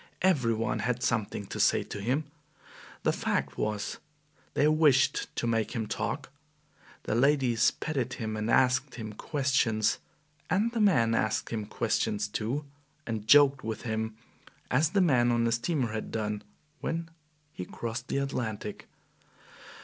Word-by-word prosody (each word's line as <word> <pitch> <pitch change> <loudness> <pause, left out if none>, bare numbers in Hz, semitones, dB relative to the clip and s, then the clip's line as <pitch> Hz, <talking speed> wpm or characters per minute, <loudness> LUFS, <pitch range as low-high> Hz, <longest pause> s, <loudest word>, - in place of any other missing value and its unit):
Every 135 -12 +3
one 115 +1 -1
had 125 0 -1
something 110 -4 -1
to - - -6
say - - +4
to 105 - -7
him. 130 +9 0 0.8
The - - +2
fact - - -1
was 105 -1 -2 0.6
they 145 - +4
wished 150 -3 +4
to - - -1
make 115 0 0
him 115 -2 -1
talk. 135 +6 -3 0.7
The - - -2
ladies 125 -2 +3
petted 135 -5 -3
him 110 -2 -4
and 110 +1 -2
asked 130 +3 +3
him 110 -2 -6
questions, 115 -6 +1 0.5
and 205 +7 +2
the 230 -2 -1
men 125 - +4
asked 110 -1 0
him 110 -3 -3
questions 105 -2 0
too, 115 +8 -2 0.4
and 110 -2 -4
joked 140 -1 +6
with 110 -1 -4
him, 110 -1 -2 0.6
as 150 +5 +3
the 195 +3 +2
men 125 -8 +4
on 120 0 +2
the 115 - +2
steamer 120 0 0
had 110 0 -4
done 105 -1 -2 0.4
when 165 0 -3 0.4
he - - -5
crossed 115 +5 -5
the - - -1
Atlantic. 110 -7 -3
120 Hz, 150 wpm, -29 LUFS, 110-140 Hz, 0.8 s, joked